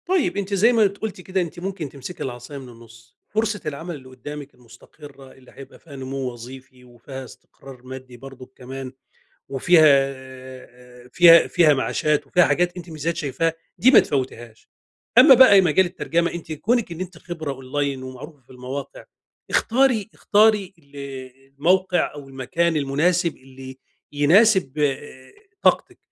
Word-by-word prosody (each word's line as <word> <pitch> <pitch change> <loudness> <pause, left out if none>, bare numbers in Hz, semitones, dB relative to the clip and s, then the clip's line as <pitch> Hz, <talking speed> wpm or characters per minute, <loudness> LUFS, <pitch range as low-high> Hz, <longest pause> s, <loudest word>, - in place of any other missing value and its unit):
طيب، 365 - 0
أنتِ 200 0 -3
زي 220 +5 +4
ما 220 -3 +4
قُلتِ 200 0 -7
كده 185 +1 -2
أنتِ 175 0 -6
ممكن 185 -5 -5
تمسكي 140 +6 -8
العصايا 125 +2 -7
من 130 -2 -11
النص، 115 0 -17
فرصة 215 -1 -1
العمل 160 +3 -5
اللي 130 -2 -13
قدامِك 145 +3 -10
المستقرة 130 +3 -16
اللي 130 -1 -19
هيبقى 135 - -14
فيها 150 -4 -14
نمو 135 0 -6 0.2
وظيفي، 130 +2 -13
وفيها 125 +2 -10
استقرار 130 0 -15
مادي 130 -1 -10
برضك 130 0 -12
كمان 130 +1 -8 0.6
وفيها 140 -2 +4 0.9
فيها 170 +4 +7
فيها 165 -4 +4
معاشات 150 +2 -1
وفيها 180 +5 +3
حاجات 175 +1 0
أنتِ 175 -1 -9
ميزات 160 +1 -3
شايفاها 160 +3 -1 0.3
دي 255 - +5
ما - - +8
تفوتيهاش. 120 -4 -5 0.5
أمّا 265 +1 +9
بقى 235 -6 +7
مجال 180 +1 +3
الترجم، 170 -1 -1
أنتِ 170 -2 -7
كونِك 210 +6 -1
إن 165 - -9
أنتِ 185 0 -7
خبرة 160 -5 -6
أونلاين 135 +1 -4
ومعروفة 135 +4 -10
في 125 - -30
المواقع، 130 +2 -8 0.5
اختاري 240 -3 +1
اختاري 210 -2 +2
ال 145 -2 -20 0.6
الموقع 180 +4 +1
أو 145 -2 -10
المكان 165 +6 -1
المناسب 160 +5 0
اللي 130 0 -13 0.3
يناسب 165 - +3
آآ، 135 -2 -3 0.3
طاقتِك. - - +1
145 Hz, 145 wpm, -22 LUFS, 130-180 Hz, 0.9 s, أمّا